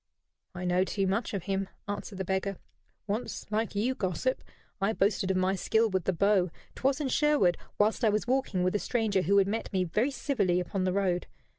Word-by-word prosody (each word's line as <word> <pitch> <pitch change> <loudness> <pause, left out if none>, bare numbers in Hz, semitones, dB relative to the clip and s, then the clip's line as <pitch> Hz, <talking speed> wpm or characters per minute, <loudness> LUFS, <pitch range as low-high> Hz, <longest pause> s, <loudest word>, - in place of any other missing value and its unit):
"I 180 +1 -4
know 180 +1 +3
too 195 +1 -1
much 195 +5 0
of 195 -4 -3
him," 195 0 -2 0.2
answered 205 0 -5
the 190 - -3
beggar. 190 +1 -1 0.5
"Once, 215 +4 -3
like 215 0 -1
you, 230 +6 +1
gossip, 205 +4 -1 0.4
I 200 +3 +2
boasted 195 -2 +1
of 190 - +2
my 185 +1 +2
skill 220 +3 +2
with 190 -3 0
the - - +2
bow 190 +1 +3 0.2
'twas 270 +2 0
in 295 - -1
Sherwood, 285 - +3 0.2
whilst 215 +3 +2
I 220 - +5
was 210 0 0
walking 245 -7 0
with 185 - +1
a 210 - +1
stranger 220 -5 +1
who 200 +4 +3
had 195 -1 +5
met 220 +3 -3
me 190 -2 +1
very 210 - +1
civilly 245 -11 0
upon 185 +2 -2
the 185 - +1
road. 185 -3 0
200 Hz, 205 wpm, -29 LUFS, 185-220 Hz, 0.5 s, I